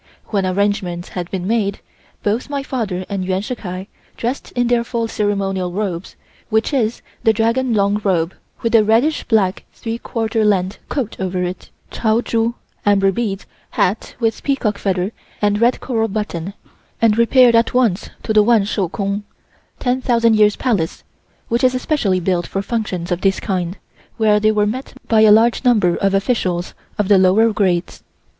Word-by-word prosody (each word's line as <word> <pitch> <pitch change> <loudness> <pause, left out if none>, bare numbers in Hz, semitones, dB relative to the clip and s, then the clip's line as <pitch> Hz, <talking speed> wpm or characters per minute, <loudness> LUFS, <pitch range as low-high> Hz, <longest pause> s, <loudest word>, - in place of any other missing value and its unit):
When 195 -3 0
arrangements 185 -2 -1
had 180 -1 -5
been 185 -2 -4
made, 205 -2 0 0.4
both 220 +7 -1
my 280 -1 -2
father 205 -9 -3
and 200 -2 -3
Yuan 185 +1 -1
Shih 215 - -4
Kai 185 -4 -6 0.3
dressed 245 +4 -3
in 245 -1 +1
their 240 0 +2
full 235 -1 -2
ceremonial 195 -4 -1
robes, 185 -2 -4 0.3
which 220 +6 +1
is 235 -4 0 0.2
the 225 - +4
dragon 230 +2 +1
long 205 0 +1
robe, 175 -3 +1 0.3
with 230 - 0
a 225 -2 +6
reddish 230 +9 +2
black 200 -5 +1
three 230 0 -5
quarter 225 -2 -1
length 195 -1 +1
coat 250 -7 -2
over 185 -1 -1
it, 180 +1 -5 0.2
chao 220 0 +1
chu 230 0 0 0.3
(amber 195 -1 +3
beads), 200 -2 -3 0.3
hat 195 +5 0
with 225 -2 0
peacock 235 -7 -1
feather 185 0 -1 0.3
and 205 0 +1
red 240 +2 +3
coral 225 -3 -1
button, 200 -3 -4 0.4
and 225 -2 +4
repaired 235 +1 +5
at 230 +1 +2
once 225 -7 +1
to 220 - -1
the 215 - +6
Wan 225 -1 +4
Shou 195 -3 -1
Kung 200 +2 -2 0.6
(10,000 240 -3 +2
years 210 -1 +4
palace), 205 -11 -1 0.4
which 235 +3 0
is 255 0 +4
especially 245 -8 0
built 175 -1 0
for 195 - -3
functions 195 -7 -3
of 175 0 -1
this 195 -1 +2
kind, 185 -2 -2 0.4
where 215 -2 +3
they 215 +1 +3
were 210 -1 +2
met 255 +6 -4
by 220 -1 +4
a 215 -1 +7
large 230 +4 +4
number 210 -9 +3
of 195 0 +1
officials 190 -5 -1 0.2
of 210 - 0
the 200 -2 +5
lower 210 +5 +4
grades. 185 -4 -1
210 Hz, 170 wpm, -19 LUFS, 190-230 Hz, 0.6 s, a